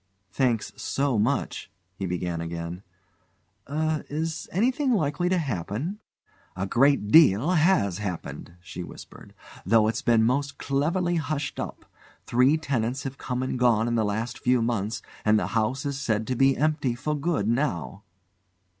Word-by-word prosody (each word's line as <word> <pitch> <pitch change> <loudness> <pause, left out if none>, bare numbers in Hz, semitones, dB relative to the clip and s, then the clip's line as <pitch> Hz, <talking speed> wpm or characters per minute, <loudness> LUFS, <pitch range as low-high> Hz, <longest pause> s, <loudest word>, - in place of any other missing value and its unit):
"Thanks 120 -2 0
so 135 -5 0
much," 125 +7 -1 0.2
he 95 0 -4
said 85 -2 -2
again. 85 +1 -5 0.9
"Er 155 +1 -1
is 160 +2 -3
anything 255 - +1
likely 170 -2 0
to 185 - +2
happen?" 135 - -3 0.6
"A 95 +1 -2
great 130 +1 +3
deal 150 - +6
has 160 - +3
happened," 90 -3 -6
she 90 0 -8
whispered, - - -12 0.3
"though 110 +2 +4
it's 110 - -1
been 115 -2 +3
most 140 +4 0
cleverly 170 +6 0
hushed 150 -2 -3
up. - - -6 0.4
Three 130 +6 +4
tenants 130 -4 -2
have 135 0 -6
come 125 0 -2
and 130 -1 -2
gone 115 -2 +3
in 120 - 0
the 115 -1 +2
last 110 +3 -2
few 125 0 +2
months, 115 -1 -2 0.2
and 110 0 +4
the - - 0
house 115 +6 0
is 140 0 -3
said 110 -5 0
to 130 - -2
be 135 +2 +3
empty 150 -5 +1
for 150 +5 -2
good 145 -8 -1
now." 115 - -1
130 Hz, 155 wpm, -26 LUFS, 110-150 Hz, 0.9 s, deal